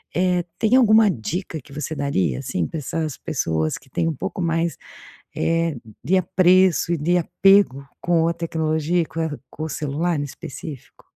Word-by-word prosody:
Eh, 180 0 +2 0.2
tem 225 +2 +3
alguma 220 -4 +6
dica 165 - -3
que 140 +1 -16
você 150 +2 -4
daria, 95 - 0
assim, 85 +4 -2
pra - - -6
essas 155 0 -3
pessoas 80 - -1
que 135 - -13
têm 165 +5 -1
um 165 - 0
pouco 145 - -5
mais, 165 -1 0 0.6
eh, 165 -2 0 0.3
de 175 +9 +2
apreço 185 -1 +3
e 170 - 0
de 170 +4 +1
apego 175 -6 +3
com 170 -2 +2
a 170 - +2
tecnologia 160 0 0
e - - -4
com 165 - -6 0.3
com 155 - -9
o 160 - -2
celular 155 +3 -1
em 145 - -1
específico? 140 0 -9
165 Hz, 170 wpm, -22 LUFS, 145-175 Hz, 0.6 s, alguma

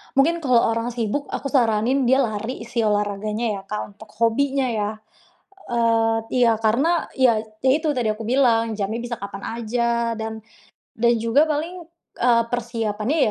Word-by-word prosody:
Mungkin 330 +5 +3
kalau 250 -6 +3
orang 230 +1 -2
sibuk, 235 +5 -2
aku 275 - -4
saranin 245 +1 +2
dia 260 +2 +4
lari 225 +1 -3
sih 235 -1 -1
olahraganya 210 +1 -1
ya, - - -10
Kak, 210 -1 -5
untuk 220 - -13
hobinya 270 +3 +2
ya. 210 -2 -1 0.8
Eee 230 -1 +2 0.3
iya 230 -1 +5
karena, 275 +10 +2
ya 250 -5 +4
itu, 240 +7 0
itu 315 - 0
tadi 225 -3 +1
aku 220 +1 -8
bilang 230 -4 +2
jamnya 210 +3 -2
bisa 240 0 -4
kapan 200 0 -7 0.2
saja 235 0 0
dan, 220 0 -5 0.5
dan 235 +1 +3
juga 230 +7 +3
paling, 330 +4 -3 0.4
eee, 235 -1 +4
persiapannya 230 +1 -2
230 Hz, 155 wpm, -22 LUFS, 220-260 Hz, 0.8 s, iya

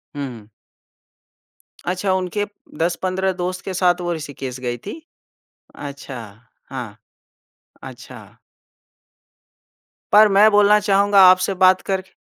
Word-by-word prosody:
हुँ, 140 -1 -4
हुँ। 115 -4 -12 1.4
अच्छा, 185 +2 -1
उनके 190 +2 -2 0.3
10-15 185 +3 -1
दोस्त 180 0 -4
के 190 - -4
साथ 180 -1 +1
वो 175 0 -2
ऋषिकेश 140 -5 -7
गई 120 -1 -4
थी? 210 - -9 0.7
अच्छा, 140 -2 -8 0.5
हाँ। 120 -6 -7 0.9
अच्छा। - - -12 1.8
पर 215 +1 +7
मैं 205 +2 +5
बोलना 205 0 +5
चाहूँगा 200 -1 +3
आपसे 185 +1 +2
बात 185 0 +5
करके 190 -1 -4
185 Hz, 110 wpm, -20 LUFS, 145-195 Hz, 1.8 s, पर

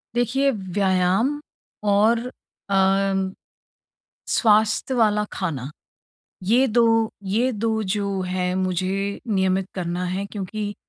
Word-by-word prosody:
देखिए, 265 +4 +2
व्यायाम 190 +6 +1 0.5
और 215 +3 +4 0.5
अम, 195 0 +2 1.0
स्वास्थ्य 215 +3 +3
वाला 210 -3 +2
खाना, 150 -8 -3 0.7
ये 240 +8 +3
दो 225 -1 +3
ये 225 +7 +1
दो 220 0 -1
जो 200 -1 -2
है, 180 0 -1
मुझे 190 +2 -1
नियमित 190 -2 +1
करना 175 0 -3
है, 185 +2 -2
क्योंकि 205 +1 -5
200 Hz, 100 wpm, -23 LUFS, 185-220 Hz, 1.0 s, और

